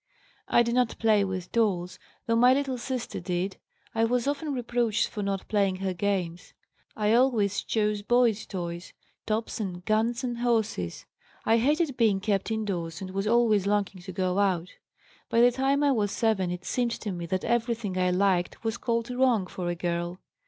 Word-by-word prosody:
"I 240 - +4
did 235 0 -1
not 250 -2 +1
play 215 -2 +3
with 185 -2 -4
dolls, 190 -6 0 0.3
though 230 - +1
my 250 +3 +6
little 270 -3 -1
sister 250 0 -4
did. 180 +2 -2 0.4
I 225 - +1
was 240 +1 +1
often 290 +1 -1
reproached 240 -3 0
for 210 - -5
not 195 -1 -2
playing 200 -3 +1
her 190 0 -2
games. 180 -2 -2 0.4
I 210 0 +2
always 230 -6 +3
chose 210 -2 0
boys' 235 -1 +2
toys, 175 -2 -5 0.3
tops 220 +1 -2
and 180 -4 -5
guns 230 +4 +1
and 240 -2 -3
horses; 210 - -1 0.4
I 225 - +4
hated 290 +2 +1
being 215 -5 +3
kept 200 0 -1
indoors 185 -7 -3
and 185 -1 -6
was 195 +2 -2
always 220 -4 +3
longing 200 -2 0
to 190 +1 -8
go 185 +1 0
out. 185 -3 +1 0.6
By 230 - +2
the 245 +1 +6
time 270 +3 +1
I 285 - +4
was 210 -5 +1
7 210 -4 +1
it 180 0 -5
seemed 240 -2 -1
to 210 - -4
me 175 -2 -5
that 185 +2 -2
everything 230 -4 -1
I 185 0 +2
liked 180 0 +1
was 225 +1 -1
called 235 0 -1
wrong 250 -5 +2
for 180 -1 -4
a 175 - -1
girl. 175 +1 -3
210 Hz, 180 wpm, -27 LUFS, 185-235 Hz, 0.6 s, my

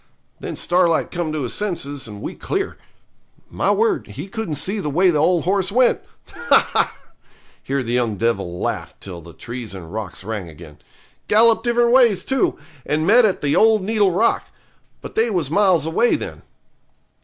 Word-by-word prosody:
Then - - -6
Starlight 175 -2 +1
come 170 -3 -3
to 155 -2 -3
his 125 - -3
senses, 145 - -3
and 105 -1 -9
we - - -4
clear. 390 0 -3 0.8
My - - 0
word, 440 -5 +1
he - - -8
couldn't 195 -6 -4
see 190 +9 -1
the 150 - -3
way 180 +5 +3
the 150 - 0
old 170 +2 +2
horse 190 0 0
went. 250 +3 +3 0.3
Ha, 475 - +2
ha!' - - 0 0.6
here 135 -1 -2
the 120 0 -3
young 120 -4 0
devil 95 -5 -1
laughed - - -4
till 90 -3 -9
the 85 +1 -13
trees 120 -4 -7
and 85 -1 -10
rocks 100 -5 -6
rang 105 -4 -5
again. 75 -2 -13 0.5
'Gallop 225 +2 +4
different 240 0 +2
ways, 235 -7 +4
too, 265 -2 0 0.3
and 155 +4 -1
met 230 +5 +6
at 195 - 0
the 145 0 +1
old 220 -2 +4
needle 205 -1 +2
rock. 210 +7 +1 0.5
But - - -9
they 225 +2 +2
was 170 -9 -1
miles 185 -5 +3
away 165 +9 +2
then.' - - -6
170 Hz, 180 wpm, -20 LUFS, -, 0.8 s, met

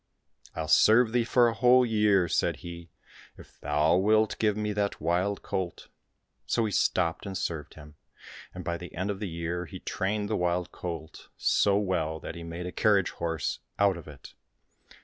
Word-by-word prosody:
" - - -26
I'll 80 - -3
serve 110 +6 +5
thee 120 0 +2
for 120 +1 +4
a 115 - 0
whole 125 +1 +5
year," 105 -5 +3
said - - 0
he, 85 -1 -8 0.5
"if - - -16
thou 75 +4 +2
wilt 110 +3 +3
give 105 -2 +1
me 105 0 -1
that 100 0 -1
wild 90 +5 0
colt." 90 -3 -4 0.6
So 115 - +1
he 105 - -2
stopped 85 0 0
and 95 -1 -4
served 80 -6 -4
him, 75 -1 -14 0.5
and - - -8
by 85 0 -2
the 90 0 -10
end 95 +4 -1
of 100 - -6
the 105 -3 -4
year 85 +1 -4
he - - -8
trained 100 +2 -2
the 110 - -1
wild 90 0 -1
colt 80 -3 -7
so 100 -1 +3
well 85 -6 -1
that - - -7
he 85 - -9
made 85 +1 -6
a 90 - -4
carriage 100 -3 +2
horse 80 -2 -3 0.2
out 100 -2 +3
of 85 - -10
it. 75 -2 -12
90 Hz, 190 wpm, -28 LUFS, 85-105 Hz, 0.6 s, serve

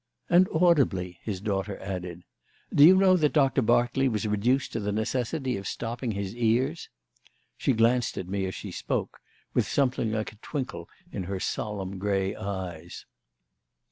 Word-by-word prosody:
"And 180 +2 +6
audibly," 135 - +2
his 100 -4 -4
daughter 100 -1 -2
added. 90 -2 -6 0.5
"Do 145 - +6
you 180 +5 +9
know 190 -1 +5
that 150 -4 +2
Doctor 135 -3 +3
Berkeley 120 +3 +2
was 110 -2 -2
reduced 120 +6 +1
to 115 - -1
the 105 -1 -2
necessity 125 +4 -1
of 100 0 -6
stopping 120 0 -3
his 100 +1 -4
ears?" 120 +7 0 0.7
She 135 - +1
glanced 115 +1 +2
at 90 - -4
me, 95 0 -2
as 95 - -5
she - - -7
spoke, - - -3 0.3
with - - +1
something 125 -5 +1
like 110 -1 -3
a - - -19
twinkle 125 - -5 0.2
in 95 - -4
her 95 +1 -3
solemn 100 -2 -3
grey 95 -1 0
eyes. 90 -4 -6
110 Hz, 160 wpm, -27 LUFS, 95-130 Hz, 0.7 s, you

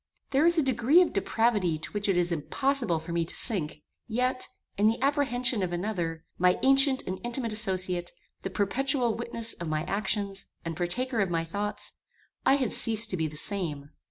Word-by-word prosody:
There 280 +4 +4
is 340 0 +5
a 315 - +4
degree 260 +5 +4
of - - -4
depravity 200 -5 +1
to 155 - -8
which 205 -1 -2
it 190 - +2
is 175 0 +1
impossible 235 - 0
for 160 +2 -7
me 170 0 0
to 165 - -8
sink; 155 - +1 0.2
yet, 250 +2 0 0.3
in 205 +2 +3
the 225 +1 +1
apprehension 260 -5 +1
of 180 -2 -1
another, 175 -3 -3
my 180 0 +4
ancient 270 0 +4
and 185 +1 -5
intimate 240 -1 -1
associate, 185 -4 -1 0.3
the 190 - -4
perpetual 245 +4 0
witness 230 -1 -2
of 170 - -7
my 155 0 -1
actions, 200 0 -2 0.2
and 165 -1 -4
partaker 230 +9 -1
of 195 -3 +1
my 165 -1 -1
thoughts, 205 +5 -4 0.5
I 270 - +6
had 260 -5 0
ceased 225 -1 +3
to 185 - -2
be 160 -1 0
the 150 0 -9
same. 155 -6 0
205 Hz, 185 wpm, -28 LUFS, 175-245 Hz, 0.5 s, I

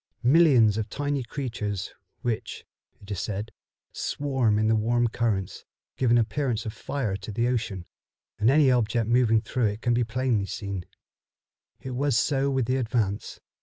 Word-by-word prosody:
Millions 125 -7 +5
of 110 0 -3
tiny 145 +3 -2
creatures, 115 -6 -4 0.3
which, 120 -3 -3 0.3
it 100 +1 -12
is 100 - -2
said, 105 +3 -4 0.4
swarm 135 -7 0
in 110 0 +2
the 110 - +4
warm 120 +2 +2
currents, 110 -5 -2 0.3
give 130 - +1
an 120 - +5
appearance 115 +1 0
of 110 - -4
fire 120 -9 -3
to 100 +2 -7
the 115 +3 0
ocean, 110 -7 -2 0.5
and 110 +2 +4
any 140 -1 +5
object 115 -2 +1
moving 115 -2 +3
through 120 +2 -1
it 105 +2 -4
can 120 - +1
plainly 125 0 0
be - - -11
seen. 100 -4 -5 0.9
It 130 - -7
was 135 0 +1
so 140 0 +1
with 135 -3 +1
the 130 +3 0
Advance. 110 -5 -2
115 Hz, 165 wpm, -26 LUFS, 105-130 Hz, 0.9 s, Millions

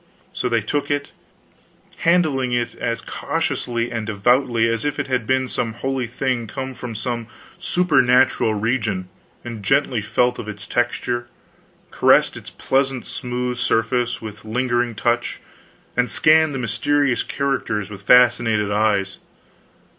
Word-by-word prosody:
So 125 - -2
they 115 -1 +2
took 140 +7 -2
it, 145 0 -2 0.9
handling 155 -8 +2
it 120 -1 -1
as 115 -1 -3
cautiously 120 0 -2
and 115 -2 -3
devoutly 115 +2 +2
as 115 -1 -1
if 145 - -2
it 145 - -1
had 125 -4 -1
been 130 0 +1
some 115 -2 -2
holy 130 +1 -2
thing 120 -1 -2
come 130 +4 -5
from 125 -2 -7
some 120 +1 -3 0.3
supernatural 130 -9 +3
region; 105 -4 -1 0.4
and 115 -3 -6
gently 130 +2 +1
felt 125 +4 +1
of 110 - -6
its 105 0 -8
texture, 120 0 -1 0.6
caressed - - +4
its - - -9
pleasant 135 -2 -1
smooth 125 0 -3
surface 120 +1 0
with 105 -1 -8
lingering 120 +1 0
touch, 120 +2 -1 0.6
and 125 -1 +1
scanned 155 +3 +4
the - - -1
mysterious 130 +2 +1
characters 115 -7 -2
with 100 -2 -9
fascinated 115 -2 +4
eyes. 100 -2 +1
120 Hz, 135 wpm, -21 LUFS, 110-130 Hz, 0.9 s, caressed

